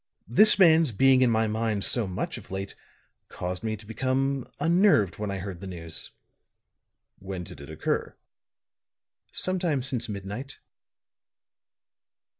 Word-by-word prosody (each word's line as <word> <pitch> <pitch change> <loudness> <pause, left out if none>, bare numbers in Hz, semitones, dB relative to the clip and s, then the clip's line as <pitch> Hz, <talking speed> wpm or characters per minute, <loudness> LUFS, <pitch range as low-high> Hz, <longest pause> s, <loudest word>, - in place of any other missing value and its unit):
This 210 - +6
man's 165 -6 +6
being 130 +4 +4
in 125 - +5
my 110 -1 +2
mind 110 -1 -1
so 120 -5 +1
much 90 -1 -4
of - - -16
late 95 +1 -5 0.6
caused 90 +3 -5
me 110 -1 -2
to 105 - -15
become 130 +3 -1
unnerved 165 - +3
when 105 -1 -2
I 100 - -3
heard 95 -1 -6
the 100 - -6
news." 85 -3 -6 1.1
"When 95 -2 -6
did 80 - -11
it 70 - -10
occur?" 80 - -2 1.2
"Sometime 175 -8 -1
since 120 -3 -3
midnight." 105 +7 -6
110 Hz, 130 wpm, -27 LUFS, 95-135 Hz, 1.2 s, This